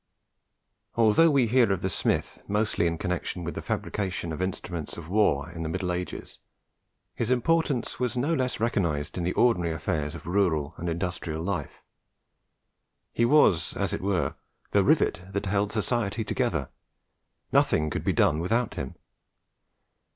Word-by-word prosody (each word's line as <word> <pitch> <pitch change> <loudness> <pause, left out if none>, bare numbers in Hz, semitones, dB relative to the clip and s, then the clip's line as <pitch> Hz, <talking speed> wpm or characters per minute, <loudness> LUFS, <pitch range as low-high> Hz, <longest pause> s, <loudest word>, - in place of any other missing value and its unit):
Although 115 +8 +5
we 140 -5 +4
hear 120 -2 +4
of 95 -2 -1
the - - +2
smith 80 - -1
mostly 105 -4 +1
in 85 0 -1
connexion 90 0 -3
with 85 - -4
the - - -5
fabrication 95 -5 -3
of 80 - -5
instruments 90 -4 -4
of 85 -1 -8
war 90 -7 +2
in 85 -1 -7
the 80 - -2
Middle 90 +2 -2
Ages, 90 +1 -5 0.7
his 115 - -2
importance 140 0 +1
was 125 -1 -1
no 145 +7 +1
less 130 -4 -1
recognized 85 -11 0
in 90 - -2
the 90 - 0
ordinary 90 -9 +3
affairs 75 -1 -2
of 80 - -10
rural 85 -5 +1
and 85 - -3
industrial 85 -2 -3
life. 90 -6 -4 1.3
He 115 - +2
was, 95 - +4
as - - -1
it - - -2
were, 95 -2 0 0.4
the - - +4
rivet - - +3
that 100 - -1
held 100 +1 0
society 110 -1 -1
together. - - -1 0.8
Nothing 75 -1 +3
could - - -3
be - - +2
done 75 - +3
without 115 +8 0
him. 65 - -5
95 Hz, 155 wpm, -27 LUFS, 85-115 Hz, 1.3 s, Although